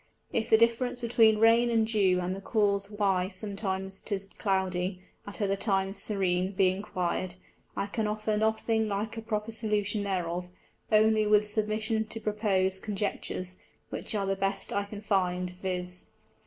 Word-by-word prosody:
If 225 0 0
the 220 - +7
difference 235 +2 +2
between 225 -2 +4
Rain 230 +2 +5
and 225 -1 +3
Dew, 200 -5 +2
and 180 +1 -2
the 195 - -8
cause 200 -2 +1
why 195 -3 +1
sometimes 190 -1 -3
'tis 200 -2 -2
Cloudy, 185 -1 -1 0.2
at 205 +1 -4
other 195 0 +1
times 195 -1 +1
Serene, 190 -2 +1
be 185 -1 +4
inquir'd, 185 -2 -2 0.4
I - - 0
can 210 +2 -2
offer 215 0 -1
nothing 220 +1 +1
like 210 +2 -2
a 225 - -5
proper 220 0 -3
Solution 210 -2 0
thereof, 180 -2 -2 0.4
only 215 0 +4
with 210 0 +4
submission 215 +1 0
to 225 - -5
propose 200 -3 +1
Conjectures, 190 -3 -3 0.3
which - - -3
are 200 -1 0
the 195 0 0
best 195 0 -1
I 200 0 0
can 205 0 -8
find, 180 -3 0
_viz. 180 -1 -3
205 Hz, 155 wpm, -29 LUFS, 190-220 Hz, 0.4 s, the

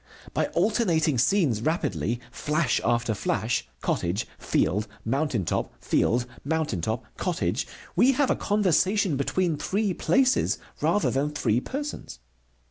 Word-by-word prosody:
By - - +1
alternating 165 - +2
scenes 135 - +2
rapidly, 115 - -1
flash 150 0 0
after 120 -1 +1
flash: 110 +3 -1
cottage, 90 +6 -1
field, 105 +7 +1 0.2
mountain 130 - 0
top, - - -2
field, 120 +1 +1 0.2
mountain 155 - -1
top, 110 +6 -2
cottage, - - -1 0.3
we 245 +9 +5
have 270 +1 +2
a - - +3
conversation 195 -3 +2
between 160 +4 0
three 200 +4 0
places 265 +7 +2 0.2
rather 210 - +2
than 140 +3 0
three 125 -6 +1
persons. 275 - -5
150 Hz, 125 wpm, -26 LUFS, -, 0.3 s, we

